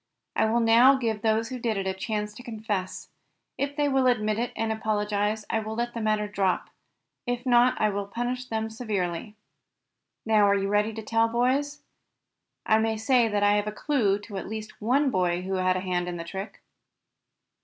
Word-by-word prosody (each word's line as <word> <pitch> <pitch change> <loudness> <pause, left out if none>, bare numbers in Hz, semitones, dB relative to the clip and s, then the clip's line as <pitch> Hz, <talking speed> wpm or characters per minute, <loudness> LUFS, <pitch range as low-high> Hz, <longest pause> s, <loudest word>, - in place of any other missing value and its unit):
I - - +3
will 230 +2 +2
now 235 +4 +6
give 225 -5 -2
those 220 0 +1
who 255 -1 -5
did 230 -3 -1
it 195 - -2
a 190 - 0
chance 210 +2 -3
to 220 - -11
confess. 215 -5 -4 0.5
If 285 0 -2
they 290 -1 +1
will 265 -2 +2
admit 215 -3 +1
it, 240 0 -2
and 225 0 -1
apologize, 210 -1 -1
I 225 - 0
will 220 0 -5
let 240 +1 -2
the 230 - -4
matter 215 -1 +1
drop. 195 -3 -1 0.6
If 245 +1 -2
not 245 0 +4
I 215 -1 +2
will 200 0 -3
punish 245 +4 -3
them 220 -2 -3
severely. 210 -4 -3 0.9
Now 215 -2 +4
are 200 - +4
you 195 0 -1
ready 210 +2 +2
to 220 0 -7
tell, 225 +1 +2
boys? 260 +5 0 0.8
I 220 0 +4
may 220 0 0
say 235 +2 +3
that 205 -1 0
I 205 0 +5
have 205 0 -1
a - - -1
clue 210 -3 +1
to 205 -1 -8
at - - -5
least 220 0 -7
one 265 +5 +2
boy 180 -2 0
who 190 +1 -3
had 185 0 +2
a - - -3
hand 180 -1 -1
in 175 -1 -4
the 170 - -5
trick." 190 +4 -7
220 Hz, 200 wpm, -26 LUFS, 205-240 Hz, 0.9 s, now